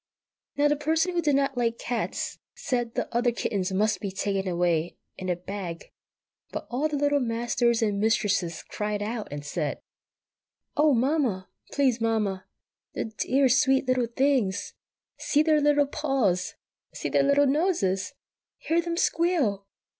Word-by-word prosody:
Now 290 +1 +4
the 295 - +2
Person 320 +4 0
who 345 - +1
did 295 -3 +2
not 275 -1 +1
like 235 -1 0
cats 240 -1 -3 0.2
said 240 -3 -2
the - - -1
other 240 0 +3
kittens 200 -5 -2
must 210 +3 +1
be 200 - -2
taken 195 0 -2
away 170 -1 0 0.2
in 185 -1 -5
a 180 - +2
bag; 180 -1 -7 0.6
but - - -5
all 270 +6 +1
the 305 - -3
Little 290 0 +2
Masters 235 -1 +1
and 205 -2 0
Mistresses 205 -6 +1
cried 210 -1 -3
out, 220 0 -4
and 145 0 -6
said,— 150 0 -2 1.0
"Oh, 300 -2 +4
Mamma!" 245 -7 0 0.2
"Please, 260 -5 +1
Mamma, 210 -4 0 0.5
the 220 - -4
dear, 270 +5 +2
sweet 265 +1 +3
little 255 -2 +2
things!" 240 -6 0 0.5
"See 300 +1 +2
their 310 -1 +3
little 290 0 +4
paws!" 270 - 0 0.4
"See - - -3
their - - +2
dear 280 - +1
little 285 0 +5
noses!" 275 - +1 0.4
"Hear 335 +1 +1
them 340 0 -3
squeal!" 295 - +1
240 Hz, 155 wpm, -26 LUFS, 200-285 Hz, 1.0 s, little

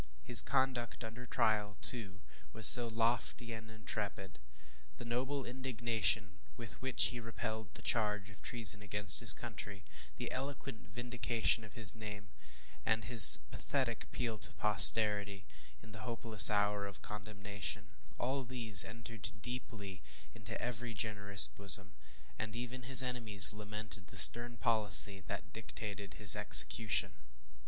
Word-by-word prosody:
His 120 - +7
conduct 120 -5 -6
under 115 +2 -14
trial, 105 -2 -5
too, 100 -6 -6 0.3
was 110 0 -5
so 120 -1 +6
lofty 115 +1 -6
and 110 0 -14
intrepid. 105 -4 -10 0.6
The 120 - -14
noble 130 +4 -8
indignation 115 -6 -6 0.2
with 115 -2 -14
which 130 -1 -1
he 120 - -11
repelled 110 -1 -11
the 115 - -8
charge 105 -3 -4
of 105 - -19
treason 110 -3 -2
against 105 -2 0
his - - +6
country 100 -1 -6 0.3
the - - -10
eloquent 135 -2 -11
vindication 120 0 -5
of 105 +1 -17
his 110 -4 -3
name 105 -2 -14 0.5
and 110 0 -5
his 115 - +9
pathetic - - -8
appeal 115 -3 -9
to - - 0
posterity, 105 -1 +4 0.4
in 110 - -19
the 110 - -15
hopeless 115 -5 +3
hour 105 -1 -5
of 100 - -15
condemnation, 105 -1 -10 0.3
all 135 +2 -7
these 115 -6 +3
entered 110 -1 -13
deeply 110 -6 -11 0.3
into 115 +1 -13
every 120 -1 -9
generous 100 -1 +2
bosom, 95 -1 -4 0.5
and 105 +1 -10
even 125 +2 -11
his 130 -1 +7
enemies 110 -7 +1
lamented 105 -1 -13
the - - -10
stern 120 +3 +3
policy 105 -4 -1
that 90 - -12
dictated 105 -2 -12
his 105 -3 +6
execution. 110 -4 +3
110 Hz, 135 wpm, -30 LUFS, 100-120 Hz, 0.6 s, his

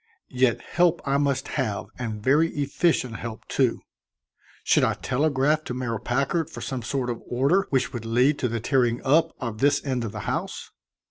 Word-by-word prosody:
Yet 125 -1 +2
help 175 -1 +2
I 140 0 +2
must 140 -2 0
have 110 -8 -2
and 110 -4 -4
very 150 +6 +4
efficient 140 -4 0
help, 115 -3 -7
too. - - +1 0.8
Should - - +3
I - - +2
telegraph 145 +2 +1
to 125 - -4
Mayor 120 -3 -2
Packard 140 +8 0
for - - -9
some 130 -2 -3
sort 125 +1 -2
of 120 - -6
order 140 +11 +2
which 130 -2 0
would 120 -3 -5
lead 125 +6 +2
to 125 - +1
the 115 0 -2
tearing 120 0 +1
up 150 +5 +3
of 115 -4 -4
this 145 +2 +3
end 130 -3 -1
of 110 - -4
the 105 -1 -6
house? - - -4
130 Hz, 185 wpm, -25 LUFS, 120-145 Hz, 0.8 s, very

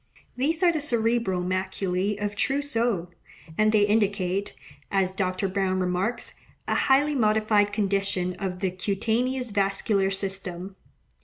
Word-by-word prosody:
These 315 +7 0
are 350 - +6
the 315 -3 -2
cerebral 230 -8 +1
maculae 185 +1 -1
of 205 0 -3
Trousseau; 235 - 0 0.5
and 215 +3 +3
they 215 -1 +4
indicate, 200 -2 0 0.3
as 195 -2 +1
Dr. 190 +1 -1
Browne 190 -1 0
remarks, 185 +6 -1 0.3
a - - +1
highly 285 +3 +3
modified 215 -4 +2
condition 195 -3 0
of 185 -1 -4
the 190 -2 0
cutaneous 225 +6 -1
vascular 195 0 +1
system. 190 -1 -4
200 Hz, 125 wpm, -26 LUFS, 190-225 Hz, 0.5 s, are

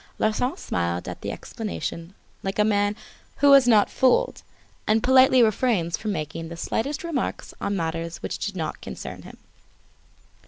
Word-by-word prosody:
Larsan 220 +4 0
smiled 85 0 -2
at - - -7
the - - -3
explanation 165 - -6 0.3
like 195 0 -4
a 210 - +4
man 205 -1 +1 0.4
who 285 0 +5
was 275 -3 +7
not 215 -4 +5
fooled 260 -1 +2 0.5
and 215 +1 +3
politely 260 -1 +6
refrains 215 -6 +1
from 215 - -4
making 165 -1 -4
the 170 - -8
slightest 275 - -2
remark 325 -6 -2 0.2
on 200 - -1
matters 165 -1 -3
which - - -4
did 205 -2 -3
not 160 -3 -4
concern - - -7
him. - - -12
205 Hz, 155 wpm, -24 LUFS, 165-250 Hz, 0.5 s, was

